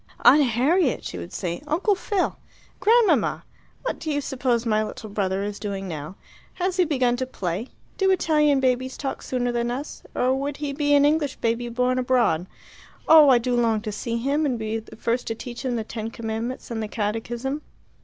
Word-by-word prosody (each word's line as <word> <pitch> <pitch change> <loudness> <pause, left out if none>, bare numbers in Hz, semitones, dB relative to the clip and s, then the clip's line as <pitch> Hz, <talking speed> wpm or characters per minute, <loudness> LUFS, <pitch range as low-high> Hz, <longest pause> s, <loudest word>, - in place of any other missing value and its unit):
"Aunt 300 - +8
Harriet!" 270 +5 +2
she 90 - -5
would 85 0 -8
say. 175 +5 -4
"Uncle 355 +8 +2
Phil! 395 0 -1 0.4
Grandmamma! 455 0 +3 0.4
What - - -3
do 315 - -5
you 290 -1 +1
suppose 250 -4 -1
my 215 -1 +2
little 215 0 -7
brother 195 -1 -1
is 205 0 -4
doing 195 -2 -4
now? 155 +1 -6 0.4
Has 370 0 -1
he 365 - +4
begun 255 -5 +1
to 260 0 -2
play? 190 -1 -3 0.3
Do 385 -1 +3
Italian 300 -6 +3
babies 260 0 0
talk 270 -2 -4
sooner 245 -1 -1
than 240 0 -1
us, 265 +5 -5
or 255 +1 +2
would 275 +1 -2
he 290 -1 -3
be 290 0 +2
an 285 0 +5
English 295 -2 +1
baby 235 +1 -1
born 250 +2 +1
abroad? 240 -9 +2 0.6
Oh, 315 -3 +8
I 255 - +7
do 245 +1 -1
long 230 -2 +2
to 215 -1 -4
see 230 +3 -3
him, 280 +6 0
and 265 -5 0
be 220 0 -2
the 220 - -13
first 235 +2 -1
to 225 - -2
teach 240 +2 -7
him 255 -2 -1
the 225 - -1
Ten 220 0 -5
Commandments 230 +2 -5
and 225 -1 -2
the 215 - -3
Catechism." 230 +6 -3
245 Hz, 195 wpm, -24 LUFS, 225-285 Hz, 0.6 s, Aunt